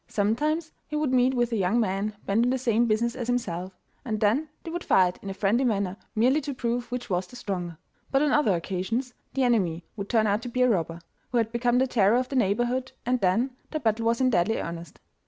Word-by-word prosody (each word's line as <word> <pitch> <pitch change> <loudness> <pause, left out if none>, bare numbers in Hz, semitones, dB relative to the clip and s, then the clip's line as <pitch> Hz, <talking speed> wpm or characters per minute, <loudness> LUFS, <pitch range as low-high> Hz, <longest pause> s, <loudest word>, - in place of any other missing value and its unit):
Sometimes 300 +11 0 0.2
he 300 - -5
would 300 -3 0
meet 255 +1 +3
with 240 -1 +1
a - - 0
young 195 +4 +2
man 205 0 -1
bent 210 +4 +2
on 245 - +2
the 260 - +1
same 235 -2 +2
business 230 +2 +1
as 245 -3 -4
himself, 190 -7 -2 0.3
and 215 -4 -2
then 235 +10 +2
they 330 - -6
would 345 +1 -4
fight 180 -1 +3
in 200 - -6
a - - -3
friendly 215 +6 +2
manner, 200 -6 0 0.2
merely 255 +7 +3
to 280 -1 -5
prove 240 0 -2
which 245 0 -4
was 180 -2 -1
the - - -14
stronger, 180 -8 -4 0.3
but 270 +1 +2
on 300 - +2
other 260 -11 +3
occasions 200 +9 -2 0.2
the 270 - +2
enemy 185 -9 +1
would 200 -2 -6
turn 220 -2 +3
out 205 +1 +1
to 245 - -6
be 250 +1 +1
a - - +5
robber, 170 -5 -1 0.3
who 245 - +1
had 225 -1 +1
become 240 +1 +1
the 260 - +4
terror 225 -3 +3
of 255 0 -1
the 275 - -4
neighbourhood, 240 +3 +1
and 250 +1 +1
then 200 +8 +2 0.2
the 310 - -3
battle 225 -3 0
was 230 0 +2
in 255 -1 +3
deadly 205 +2 +2
earnest. 170 -2 -7
230 Hz, 235 wpm, -26 LUFS, 200-255 Hz, 0.3 s, a